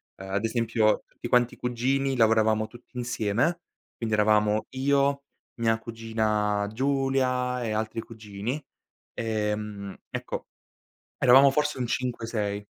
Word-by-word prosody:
Ehm, 95 Hz, 0 st, -9 dB
ad 100 Hz, +3 st, 0 dB
esempio 115 Hz, -2 st, +1 dB
tutti 120 Hz, -, -8 dB
quanti 120 Hz, 0 st, +3 dB
i -, -, -13 dB
cugini 130 Hz, +3 st, 0 dB
lavoravamo 110 Hz, -1 st, +3 dB
tutti 120 Hz, +2 st, -15 dB
insieme, 120 Hz, +8 st, 0 dB, 0.3 s
quindi 110 Hz, -2 st, -1 dB
eravamo 105 Hz, 0 st, +3 dB
io, 140 Hz, +1 st, +1 dB, 0.4 s
mia 115 Hz, -1 st, +2 dB
cugina 110 Hz, -3 st, -1 dB
Giulia 130 Hz, -1 st, 0 dB
e 110 Hz, -, -2 dB
altri 110 Hz, +1 st, -2 dB
cugini. 110 Hz, +3 st, -5 dB, 0.5 s
Ehm, 105 Hz, -3 st, -3 dB
ecco -, -, -5 dB, 0.7 s
eravamo 135 Hz, +2 st, +7 dB
forse 150 Hz, 0 st, 0 dB
un 125 Hz, -, -1 dB
5, 125 Hz, -2 st, -2 dB
6. 105 Hz, -3 st, -2 dB
115 Hz, 120 wpm, -27 LUFS, 105-125 Hz, 0.7 s, eravamo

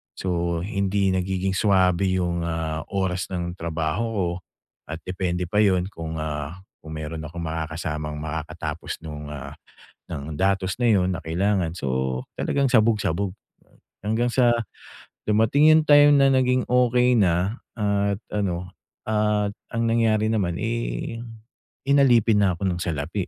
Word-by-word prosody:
So, 85 Hz, -2 st, -1 dB
hindi 100 Hz, -1 st, 0 dB
nagiging 95 Hz, +1 st, -1 dB
swabe 95 Hz, -2 st, +3 dB
'yung, 85 Hz, -2 st, -1 dB
ah, 80 Hz, -1 st, -3 dB
oras 95 Hz, -2 st, -1 dB
ng 90 Hz, -1 st, -4 dB
trabaho 80 Hz, +5 st, -1 dB
ko 95 Hz, -4 st, +1 dB, 0.6 s
at 80 Hz, +1 st, -5 dB
depende 90 Hz, -1 st, -2 dB
pa 105 Hz, +5 st, 0 dB
'yon 95 Hz, -3 st, +3 dB
kung, 80 Hz, -3 st, -6 dB
ah, 75 Hz, 0 st, -4 dB, 0.2 s
kung 80 Hz, 0 st, -9 dB
meron 80 Hz, +1 st, -5 dB
akong 85 Hz, +2 st, -7 dB
makakasamang 80 Hz, -1 st, -4 dB
makakatapos 80 Hz, +1 st, -5 dB
nung, 75 Hz, -2 st, -7 dB
ah, 75 Hz, -3 st, -7 dB, 0.6 s
ng 75 Hz, +2 st, -5 dB
datos 95 Hz, +1 st, +1 dB
na 120 Hz, -, +3 dB
'yon 95 Hz, -2 st, +2 dB
na -, -, -6 dB
kailangan 90 Hz, +1 st, 0 dB
so, 65 Hz, -3 st, -1 dB, 0.2 s
talagang 140 Hz, -1 st, +1 dB
sabog-sabog 105 Hz, -6 st, +2 dB, 0.7 s
hanggang 110 Hz, +4 st, 0 dB
sa, 120 Hz, 0 st, +4 dB, 0.8 s
dumating 110 Hz, +8 st, +4 dB
'yung 155 Hz, 0 st, +5 dB
time 145 Hz, 0 st, +7 dB
na 140 Hz, -1 st, +5 dB
naging 130 Hz, -1 st, +2 dB
okey 125 Hz, 0 st, +4 dB
na 95 Hz, +1 st, +1 dB, 0.2 s
at 100 Hz, -2 st, +1 dB, 0.2 s
ano, 90 Hz, -3 st, -2 dB, 0.4 s
at 105 Hz, -1 st, +1 dB, 0.2 s
ang 115 Hz, 0 st, 0 dB
nangyari 110 Hz, -2 st, +2 dB
naman, 90 Hz, -6 st, 0 dB
eh, 115 Hz, +1 st, -3 dB, 0.7 s
inalipin 120 Hz, -6 st, +4 dB
na 95 Hz, -2 st, +3 dB
ako 85 Hz, -, -8 dB
ng 85 Hz, -, -3 dB
salapi. 85 Hz, +4 st, -3 dB
95 Hz, 135 wpm, -24 LUFS, 80-110 Hz, 0.8 s, time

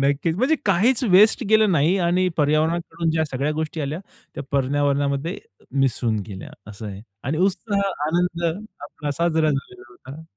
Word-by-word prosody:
नक्कीच. 140 Hz, +4 st, +1 dB
म्हणजे 265 Hz, +8 st, +3 dB
काहीच 220 Hz, +8 st, +3 dB
वेस्ट 210 Hz, +6 st, +6 dB
गेलं 220 Hz, -2 st, +5 dB
नाही 165 Hz, +5 st, +3 dB
आणि 180 Hz, +1 st, +2 dB
पर्यावरणाकडून 160 Hz, +2 st, +1 dB
ज्या 160 Hz, 0 st, +1 dB
सगळ्या 140 Hz, +1 st, -2 dB
गोष्टी 155 Hz, +1 st, -3 dB
आल्या, 145 Hz, +3 st, -3 dB, 0.4 s
त्या 140 Hz, -, -5 dB
पर्यावरणामध्ये 140 Hz, +3 st, 0 dB, 0.4 s
मिसळून 120 Hz, -4 st, +1 dB
गेल्या, 95 Hz, -3 st, -8 dB, 0.2 s
असं 105 Hz, +1 st, -8 dB
आहे. 100 Hz, 0 st, -7 dB, 0.2 s
आणि 150 Hz, +4 st, -1 dB
उत्साह, 200 Hz, +1 st, 0 dB, 0.2 s
आनंद, 170 Hz, +1 st, 0 dB, 0.4 s
आपला 145 Hz, 0 st, -6 dB
साजरा 160 Hz, +1 st, +1 dB
झालेला 130 Hz, -3 st, -5 dB
होता. 135 Hz, +6 st, -11 dB
155 Hz, 145 wpm, -22 LUFS, 140-180 Hz, 0.4 s, वेस्ट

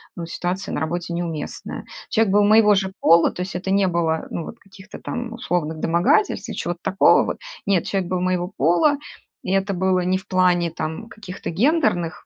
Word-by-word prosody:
ну, 170 Hz, -, -5 dB
ситуация 180 Hz, +3 st, -3 dB
на -, -, -1 dB
работе 170 Hz, +2 st, -3 dB
неуместная. 170 Hz, -3 st, -5 dB, 0.2 s
Человек 220 Hz, -3 st, +2 dB
был 205 Hz, 0 st, +5 dB
моего 210 Hz, 0 st, +6 dB
же 190 Hz, -1 st, -1 dB
пола, 165 Hz, +1 st, +5 dB
то -, -, -6 dB
есть 185 Hz, -, -7 dB
это 190 Hz, +2 st, -3 dB
не 195 Hz, -1 st, +3 dB
было, 165 Hz, -2 st, -1 dB
ну, 170 Hz, -, -3 dB
вот 230 Hz, -, -10 dB
каких-то 195 Hz, 0 st, -13 dB
там 245 Hz, -2 st, -5 dB
условных 175 Hz, -9 st, -2 dB
домогательств 175 Hz, -, +1 dB
или -, -, -5 dB
чего-то 175 Hz, 0 st, -4 dB
такого 195 Hz, +1 st, +4 dB
вот. -, -, -3 dB, 0.3 s
Нет, 195 Hz, -4 st, +1 dB
человек 190 Hz, -3 st, -2 dB
был 185 Hz, -1 st, -1 dB
моего 180 Hz, 0 st, -1 dB
пола, 175 Hz, -, +3 dB, 0.5 s
и 185 Hz, -, -3 dB
это 195 Hz, +1 st, +1 dB
было 185 Hz, 0 st, +1 dB
не 185 Hz, +1 st, +1 dB
в 190 Hz, -, -18 dB
плане 180 Hz, -2 st, +2 dB
там 160 Hz, +7 st, -5 dB
каких-то 205 Hz, -4 st, -8 dB
гендерных 205 Hz, -, +1 dB
185 Hz, 190 wpm, -22 LUFS, 170-200 Hz, 0.5 s, моего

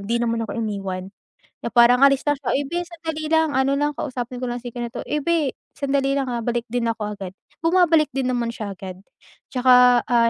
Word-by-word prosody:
'di 220 Hz, +4 st, -1 dB
naman 230 Hz, -1 st, 0 dB
ako 220 Hz, -, -6 dB
iniwan 195 Hz, -3 st, -4 dB, 0.5 s
na 235 Hz, -, -4 dB
parang 245 Hz, +2 st, +6 dB
alis 275 Hz, -1 st, +4 dB
lang 290 Hz, -1 st, 0 dB
siya, 270 Hz, -, -5 dB
"uy 280 Hz, -, +1 dB
beh! 350 Hz, +2 st, -2 dB
sandali 325 Hz, -2 st, -6 dB
lang 320 Hz, -1 st, +4 dB
ano 265 Hz, +1 st, +2 dB
lang 290 Hz, +1 st, +1 dB
kausapin 250 Hz, -2 st, -4 dB
ko 255 Hz, -, -4 dB
lang 245 Hz, -1 st, -4 dB
si 245 Hz, -, -6 dB
ganito," 240 Hz, 0 st, -5 dB
"uy 300 Hz, -, -2 dB
beh! 330 Hz, -5 st, +2 dB, 0.2 s
sandali 275 Hz, -1 st, 0 dB
lang 275 Hz, -2 st, -1 dB
ha 240 Hz, -, -2 dB
balik 240 Hz, -1 st, -1 dB
din 240 Hz, 0 st, -1 dB
ako 210 Hz, -3 st, -3 dB
agad," 190 Hz, -2 st, -7 dB, 0.3 s
bumabalik 330 Hz, -3 st, +4 dB
din 265 Hz, -1 st, -1 dB
naman 240 Hz, -2 st, -1 dB
siya 205 Hz, -3 st, -5 dB
agad 185 Hz, -1 st, -8 dB, 0.6 s
'tsaka, 250 Hz, -1 st, +5 dB
ah, 235 Hz, -1 st, +3 dB
250 Hz, 210 wpm, -22 LUFS, 230-280 Hz, 0.6 s, parang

